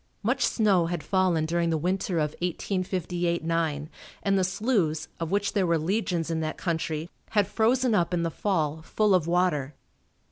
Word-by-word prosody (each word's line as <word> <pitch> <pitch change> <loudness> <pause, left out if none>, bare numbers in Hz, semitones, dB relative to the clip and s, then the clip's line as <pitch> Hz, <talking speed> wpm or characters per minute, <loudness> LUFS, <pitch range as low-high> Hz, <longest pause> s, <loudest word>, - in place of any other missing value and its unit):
Much - - +1
snow 195 -7 +3
had 170 -2 -3
fallen 185 -5 +2
during 170 +1 0
the 160 - +1
winter 180 +2 -1
of 150 -2 +1
1858 180 -1 -1
9 160 -3 -1 0.4
and 195 -1 +2
the 190 - +3
sloughs 185 -5 0
of 165 -1 -2
which 200 +1 0
there 195 -4 +2
were 170 -1 +3
legions 170 -1 -1
in 160 - 0
that 155 -1 -3
country, 160 -2 -2 0.3
had 205 - +5
frozen 245 +3 +2
up 175 -4 +2
in 175 -1 0
the 165 - -1
fall, 160 -5 -1
full 210 +5 +1
of 175 -3 +2
water. 170 -6 +1
175 Hz, 175 wpm, -27 LUFS, 160-195 Hz, 0.4 s, had